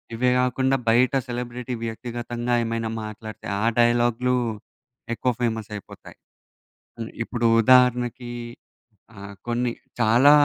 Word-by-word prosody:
ఇవే 125 +2 +2
కాకుండా 130 +1 +2
బయట 120 +3 +4
సెలబ్రిటీ 125 0 -4
వ్యక్తిగతంగా 120 +1 -4
ఏమైనా 115 0 -2
మాట్లాడితే 110 0 -8
ఆ 115 - +1
డైలాగ్‌లు, 120 +1 +3 0.8
ఎక్కువ 125 +2 0
ఫేమస్ 110 -2 -1
అయిపోతాయి. 100 - -11 1.1
ఇప్పుడు 120 0 -1
ఉదాహరణకి 125 0 +3 0.8
ఆహ్, 100 0 -9
కొన్ని 120 +1 0 0.3
చాలా 120 +5 +6
120 Hz, 100 wpm, -24 LUFS, 115-125 Hz, 1.1 s, చాలా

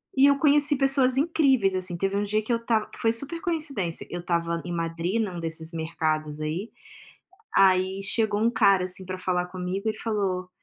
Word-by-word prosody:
E 265 - +5
eu 280 - +3
conheci 295 -1 +4
pessoas 270 -1 +3
incríveis 270 - +2
assim. 185 -1 -2
Teve 195 +2 -1
um 205 - 0
dia 215 +1 0
que 240 - -4
eu 230 - +3
estava, 230 -2 -1
que - - -13
foi 225 - +2
super 280 +9 0
coincidência, 285 - -3
eu 175 - -5
estava 170 -1 -1
em 175 - -5
Madrid 170 +6 -2
num 185 -5 -4
desses 160 0 -4
mercados 155 -2 -2
aí. 165 +8 -3 0.9
Aí 190 0 +3
chegou 210 0 0
um 230 - +3
cara 200 -5 +3
assim 185 +1 -2
pra 185 0 -6
falar 180 -1 -1
comigo 185 +3 -4
e 215 - -2
falou: 195 -5 -2
195 Hz, 190 wpm, -25 LUFS, 175-230 Hz, 0.9 s, E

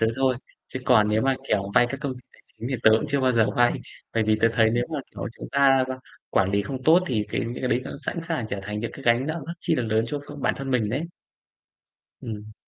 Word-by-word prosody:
tớ 115 - +4
thôi, 130 -2 +2 0.3
chứ 130 - -5
còn 110 -4 +5
nếu 110 +1 +2
mà, 135 0 +3
kiểu, 100 -1 0
vay 120 - +6
các 140 - -5
công 140 -3 -3
ty 125 - -12
tài - - -22
chính 120 - -5
thì - - 0
tớ 110 - +7
cũng 130 - -2
chưa 140 -1 +1
bao 130 -1 +3
giờ 115 -2 +4
vay. 120 0 +5 0.4
Bởi 110 - +3
vì 110 0 +2
tớ 115 - +5
thấy 110 -1 +4
nếu 120 0 +1
mà, 150 - -1
kiểu, 100 -1 -6
chúng - - -7
ta 135 -1 +5
qu 130 - -2 0.4
quản 95 0 +2
lý 100 0 +2
không 130 +3 -5
tốt 160 +5 +6
thì 110 -5 0
cái - - -1
những 120 +1 -4
cái 125 - 0
đấy 125 - +2
nó - - -6 0.2
sẵn - - -2
sàng 160 -9 -1
trở 100 - -3
thành 105 +2 -4
những 115 +2 -4
cái 135 - -10
gánh 120 +2 +3
nặng 160 -1 -3
rất 170 - -4
chi - - +1
là 125 - 0
lớn 110 0 +1
cho 145 +5 -3
c 145 0 -10
bản - - +1
thân 135 0 -5
mình 120 -5 +1
đấy. 135 +7 -1 1.2
Ừm. 105 -2 -7
120 Hz, 280 wpm, -25 LUFS, 110-135 Hz, 1.2 s, tớ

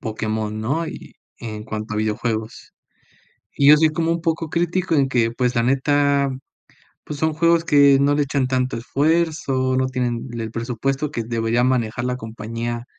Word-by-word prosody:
Pokémon, 110 -1 -3
¿no?, 140 +9 -1
y - - -9 0.2
en 110 -2 -7
cuanto 110 0 -5
a - - -3
videojuegos. 110 +1 -3 0.8
Y 140 0 +4
yo 150 - +9
soy 160 +1 +4
como 165 +1 -1
un 170 0 0
poco 165 -1 -2
crítico 175 +1 0
en 140 -3 +3
que, 120 -3 +1
pues, 125 +1 -1
la 115 - +2
neta, 140 +2 +2 0.7
pues, 150 -1 -7
son 160 0 +1
juegos 170 +1 +3
que 140 -3 +5
no 140 +1 +3
le 145 - +2
echan 140 -2 0
tanto 130 -1 -1
esfuerzo, 140 -1 0
no 130 - +1
tienen 125 -1 -2
el 115 -1 -4
presupuesto 135 +5 -2
que 115 -6 -4
debería 115 +1 0
manejar 120 -2 0
la 125 0 -1
compañía, 115 +1 -5
130 Hz, 170 wpm, -21 LUFS, 115-145 Hz, 0.8 s, yo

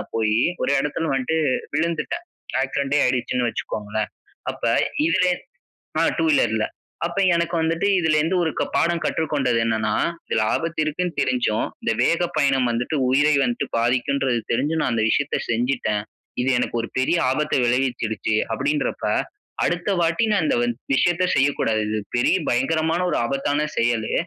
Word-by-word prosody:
போயி, 110 -1 +2 0.3
ஒரு - - +1
இடத்துல 160 +3 -2
வன்ட்டு 135 +4 0 0.4
விழுந்துட்டேன். 170 - -1 0.4
ஆக்சிடெண்டே 140 +2 0
ஆயிடுச்சுன்னு 125 -1 0
வச்சுக்கோங்களேன். 105 0 -4 0.4
அப்ப - - -14 0.5
இதுலே 180 +2 +3 0.7
அ - - +4
2 165 - +2
வீலர்‌ல. 110 -7 +2 0.4
அப்ப 170 +3 -4 0.2
எனக்கு 170 0 0
வந்துட்டு, 165 +4 0
இதுலேருந்து 160 +2 +2
ஒரு 160 - 0
க - - +2
பாடம் 170 0 +2
கற்றுக்கொண்டது 140 -7 0
என்னனா, 110 -1 0 0.3
"இதுல 110 - +1
ஆபத்து 165 -1 -3
இருக்குன்னு 170 +2 -2
தெரிஞ்சும், 120 -4 +1 0.2
இந்த - - +1
வேக 170 +1 +2
பயணம் 135 -3 +2
வந்துட்டு, 120 +6 -1
உயிரை 145 +3 +4
வந்துட்டு 240 0 -1
பாதிக்கும்ன்றது 125 +1 +1
தெரிஞ்சும், 155 +7 0
நான் 120 - 0
அந்த 110 -1 +1
விஷயத்த 145 +3 +1
செஞ்சுட்டேன். 115 -3 0 0.4
இது 130 - 0
எனக்கு 125 - -2
ஒரு - - -5
பெரிய 130 +7 +2
ஆபத்த 150 +3 0
விளைவிச்சிடுச்சு." 120 -4 0 0.2
அப்படீன்றப்ப, 145 +5 -1 0.6
அடுத்த 175 +4 -1
வாட்டி 170 +6 +2
நான் 195 -7 +2
இந்த - - +2
வந் 120 0 +1 0.2
விஷயத்த 175 +6 +2
செய்யக்கூடாது. 135 -6 +2
இது 110 0 -1 0.2
பெரிய 155 +9 +3
பயங்கரமான, 160 +7 +1
ஒரு - - +1
ஆபத்தான 145 +4 0
செயலு. 115 -2 +1
140 Hz, 145 wpm, -22 LUFS, 120-165 Hz, 0.7 s, அ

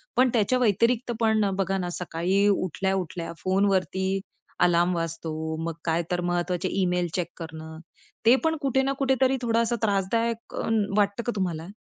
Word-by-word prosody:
पण 255 0 +4
त्याच्या 240 +3 +2
व्यतिरिक्त 235 +2 +2
पण 220 -3 +2
बघा 195 0 0
ना 180 -1 -2
सकाळी 180 +4 +1
उठल्या-उठल्या 185 -2 -1
फोनवरती 190 0 +1 0.4
अलार्म 175 0 +3
वाजतो. 160 -1 -3
मग 165 0 -2
काय 165 +1 +1
तर 175 0 0
महत्वाचे 175 +1 -1
ईमेल 180 -1 +1
चेक 175 -3 -1
करणं 160 -1 -8 0.5
ते 240 +3 +7
पण 320 0 +2
कुठे 265 -1 +2
ना 275 - 0
कुठेतरी 265 0 +2
थोडासा 230 0 +1
त्रासदायक 225 +3 0 0.4
वाटतं 205 +2 +1
का 240 - -1
तुम्हाला? 175 -3 -2
190 Hz, 140 wpm, -26 LUFS, 175-230 Hz, 0.5 s, ते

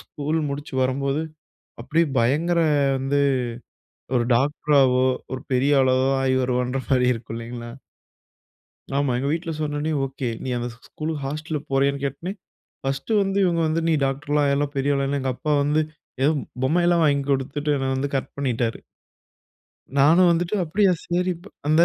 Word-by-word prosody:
School 150 +2 -3
முடிச்சு 140 0 -6
வரும்போது, 140 +3 0 0.6
அப்டியே 165 +5 +2
பயங்கர 155 +9 +2 0.4
வந்து 135 +2 0 1.0
ஒரு 120 - +3
டாக்டராவோ 135 -1 +3 0.3
ஒரு 130 - -4
பெரிய 135 +3 +3
ஆளாவோ 130 0 +3
ஆயிவருவான்ற 130 0 +1
மாரி 125 -2 +3
இருக்கும் 115 0 -7
இல்லைங்களா? 120 0 -7 1.3
ஆமா. 140 -2 +1
எங்க 135 - -1
வீட்ல 165 +1 -2
சொன்னவுனே, 150 +1 -2
ஓகே 135 -1 -4 0.2
நீ 130 - -3
அந்த 120 0 -3
ஸ் - - -18
ஸ்கூல்க்கு 155 -1 -4
ஹாஸ்டல்ல 155 +2 -3
போறியான்னு 140 +1 +1
கேட்டோனே, 140 +7 -3 0.5
பர்ஸ்ட் 135 +9 -3
வந்து 195 0 0
இவங்க 170 -2 +1
வந்து, 165 +1 0
நீ - - +3
டாக்டர்லாம் 145 +2 0
ஆயிரலாம் 140 +1 0
பெரிய 140 +1 +1
ஆள்ன்னு, 140 +1 0
எங்க 130 0 0
அப்பா 150 +4 -1
வந்து 150 +2 +2 0.4
ஏதோ 150 - +5 0.3
பொம்மை 170 +6 +2
எல்லாம் 170 -1 +4
வாங்கி 140 -2 +2
குடுத்துட்டு 140 +2 -1
என்னை 135 0 -2
வந்து 140 +2 -1
கரெக்ட் 135 - -1
பண்ணிட்டாரு. 120 -4 -1 1.2
நானும் 165 +6 +6
வந்துட்டு 175 +4 0
அப்டியா, 190 +4 +3 0.2
சரி 180 +1 +1
ப் - - -12 0.2
அந்த 155 +2 +5
140 Hz, 150 wpm, -23 LUFS, 130-155 Hz, 1.3 s, நானும்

